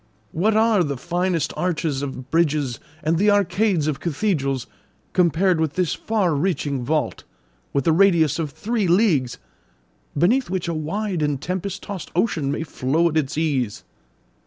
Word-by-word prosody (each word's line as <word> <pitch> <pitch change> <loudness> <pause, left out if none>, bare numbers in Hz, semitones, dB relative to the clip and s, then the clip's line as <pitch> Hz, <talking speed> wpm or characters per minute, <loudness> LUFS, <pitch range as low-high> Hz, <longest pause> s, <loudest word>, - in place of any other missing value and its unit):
What 210 +6 +1
are 220 -4 +4
the 140 -4 -3
finest 175 +3 -1
arches 160 -6 -1
of 130 -2 -6
bridges 150 -7 +1 0.2
and 160 +2 +1
the 210 +2 +4
arcades 200 -4 +2
of 150 -3 -1
cathedrals, 145 - -1 0.5
compared 175 0 +3
with 155 -3 0
this 180 -3 0
far 205 -7 0
reaching 145 -4 -1
vault, 150 -2 -1 0.5
with 140 -2 0
a 165 - +4
radius 170 -4 +4
of 160 -3 -1
three 215 - -2
leagues, 170 - +2 0.8
beneath 225 - +2
which 185 -2 -2
a 170 - -1
wide 180 +4 -2
and 145 -2 0
tempest 185 +4 -4
tossed 195 -4 -6
ocean 165 -8 +1
may 160 - -2
flow 160 +3 +1
at 160 - -1
its 150 -1 -1
ease?" 135 -9 -1
165 Hz, 155 wpm, -22 LUFS, 145-190 Hz, 0.8 s, are